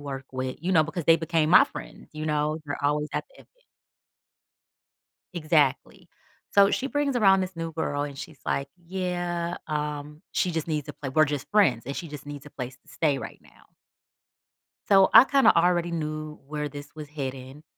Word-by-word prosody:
work 140 -2 -6
with," 130 0 -3
you 180 +3 -1
know, 160 -3 +6
because 160 +1 -5
they 165 - +7
became 160 -1 0
my 185 - +8
friends, - - -10
you 155 0 -5
know, 150 0 0
they're 145 0 -5
always 150 +1 +1
at - - -1
the - - -23
event. - - -18 1.9
Exactly. 155 -5 0 0.4
So 200 0 +5
she 270 - -1
brings 285 -1 -1
around 195 -5 +5
this 185 0 -5
new 165 0 -4
girl 145 -2 -2
and 140 -2 -6
she's 155 -1 -9
like, 140 0 -1
"Yeah, 175 -1 -3
um, 150 0 -4
she 180 - 0
just 160 -1 -3
needs 150 -3 -2
to - - -8
play, 135 - -6
we're 155 +4 +4
just 145 -2 -4
friends 165 - +3
and 140 - -5
she 170 - -5
just 150 -1 -9
needs 145 -1 -8
a 150 - -10
place 130 -1 -7
to - - -37
stay 145 -4 0
right - - -8
now." - - -22 1.2
So 195 -1 +6
I - - +11
kinda 275 0 +4
already 175 0 +2
knew 155 -2 -4
where 150 0 -3
this 145 +1 -9
was 155 -1 -8
heading. 135 0 -6
155 Hz, 190 wpm, -26 LUFS, 145-175 Hz, 1.9 s, I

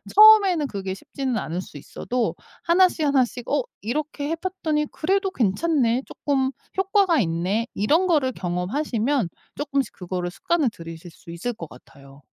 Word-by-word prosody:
처음에는 400 -8 +7
그게 195 -4 -4
쉽지는 260 +3 -3
않을 175 -3 -3
수 170 - -11
있어도 235 - -3 0.3
하나씩 345 -2 +3
하나씩 255 -4 +1
'어 285 -3 +1 0.2
이렇게 290 +5 -3
해 330 - 0
봤더니 325 -4 -2
그래도 385 +4 0
괜찮네 250 - +1
쪼끔 270 -2 -1 0.3
효과가 385 -3 +3
있네.' 190 +5 0
이런 310 - +2
거를 290 -7 +2
경험하시면 220 - -1 0.3
쪼끔씩 280 -2 -1
그거를 180 -1 -4
습관을 320 - +1
들이실 165 -1 -10
수 170 - -17
있을 215 +9 -3
것 165 -7 -9
같아요. 140 +2 -16
260 Hz, 340 characters per minute, -24 LUFS, 190-315 Hz, 0.3 s, 처음에는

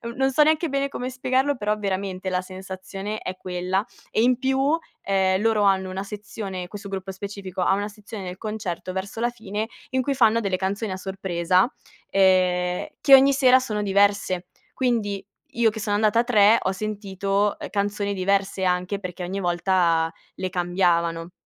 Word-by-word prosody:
non 270 0 +2
so 300 +3 +5
neanche 315 +2 +2
bene 275 0 0
come 255 -2 -4
spiegarlo, 260 +2 0
però, 210 -1 0
veramente, 190 -2 -3
la 180 0 0
sensazione 190 +2 -6
è 185 - -5
quella. 185 +2 -1 0.3
E, - - +2
in 245 +1 +4
più, 270 +4 +2 0.2
ehm, 190 -1 +1
loro 220 -1 +2
hanno 190 -1 +2
una 190 +1 -4
sezione 200 -2 -6
questo 200 +1 -8
gruppo 195 0 -4
specifico, 195 -1 -6
ha 180 - +3
una 205 +1 -1
sezione 210 0 -9
del 180 0 -6
concerto 205 -5 -4
verso 195 +4 -5
la 240 - +2
fine, 220 -2 -4 0.2
in 260 0 +1
cui 280 - 0
fanno 230 -3 +4
delle 195 -4 -1
canzoni 200 +3 -2
a 185 - -3
sorpresa, 185 0 +1 0.4
ehm, 180 -2 +2
che 275 - +5
ogni 270 +1 +6
sera 260 -2 +6
sono 215 -5 -3
diverse. 200 -2 +2 0.3
Quindi 225 -6 -1 0.3
io 230 -1 +3
che 220 - -7
sono 205 -1 -1
andata 215 +1 +3
a - - +4
3, 220 -2 +5
ho 190 - 0
sentito, 200 0 -1
uhm - - -6
,canzoni 205 0 -1
diverse 195 0 0
anche 180 +2 0
perché 180 -2 -6
ogni 190 +3 -3
volta 175 -2 +2 0.2
le 185 - -3
cambiavano. 175 -2 0
200 Hz, 175 wpm, -24 LUFS, 185-220 Hz, 0.4 s, ogni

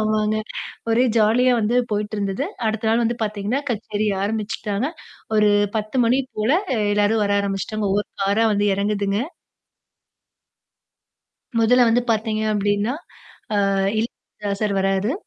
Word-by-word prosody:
ஆமாங்க. 215 0 +1 0.5
ஒரே 240 +3 +4
ஜாலியா 230 +4 +4
வந்து 230 +2 +1
போயிட்டு 210 +1 -2
இருந்தது. 200 +5 -1 0.2
அடுத்த 220 0 -1
நாள் 230 +1 +3
வந்து 235 +1 0
பாத்தீங்கன்னா, 210 +4 -1
கச்சேரி 215 -1 -2 0.2
ஆரம்பிச்சுட்டாங்க. 210 +2 -2 0.5
ஒரு 210 -1 +5 0.3
10 215 +3 -3
மணி 250 +3 +3 0.2
போல 215 +5 +2 0.2
அ - - 0 0.2
எல்லாரும் 210 +1 +2
வர 200 - 0
ஆரம்பிச்சுட்டாங்க. 200 +1 -2
ஒவ்வொரு 205 +1 0
காரா 200 +3 +2
வந்து 205 +1 +1
எறங்குதுங்க. 200 0 0 2.4
முதல்ல 245 +2 +5
வந்து 240 +2 +3
பாத்தீங்க 220 0 0
அப்டீன்னா, 205 +3 0 0.6
ஆ - - +2 0.4
இளையராஜா 210 -2 -5
சார் 205 -2 +1
வர்ராரு! 195 +5 +1
215 Hz, 125 wpm, -22 LUFS, 205-225 Hz, 2.4 s, ஒரு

